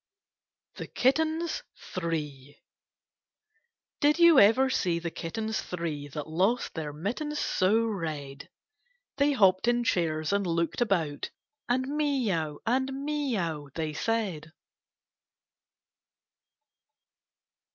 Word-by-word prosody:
THE - - -6
KITTENS 320 +5 +1 0.3
THREE 150 -5 -4 1.4
Did 300 +1 +4
you 340 -4 +7
ever 225 +6 +6
see 180 -9 0
the 170 0 -4
kittens 220 +8 -3
three 160 -5 -4
That 150 +1 -6
lost 190 +10 0
their 155 -3 -4
mittens 240 - -3
so 210 -2 +2
red? 155 -9 -5 0.7
They 285 0 +3
hopped 190 -4 +4
in 240 0 +3
chairs 160 -5 0
and 200 0 +2
loolied 170 +5 -1
about, 170 -10 0 0.4
And 255 +2 +2
'mee 285 -6 0
ow' 155 -4 -2
and 260 +3 +1
'mee 280 -2 -2
ow,' 155 -5 -3
they 155 -2 -2
said. 180 -6 -2
195 Hz, 105 wpm, -28 LUFS, 160-260 Hz, 1.4 s, you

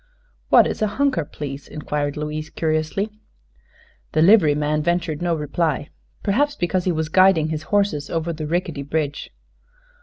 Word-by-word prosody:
"What - - +7
is - - -3
a 215 - +3
'hunker,' 270 - +1
please?" 140 -1 -7
inquired 145 -1 -3
Louise, 150 +1 -4
curiously. 160 +6 -1 1.0
The 155 - +4
liveryman 150 -6 +4
ventured 170 -1 -1
no 175 -1 +1
reply, 150 -1 -1 0.3
perhaps 285 +8 +1
because 180 -3 -1
he 185 - +2
was 160 -1 -1
guiding 180 -2 +4
his 155 -1 -3
horses 200 -8 +1
over 165 0 -2
the 155 -1 -5
rickety 165 -3 -2
bridge. 145 0 -3
160 Hz, 145 wpm, -22 LUFS, 150-180 Hz, 1.0 s, What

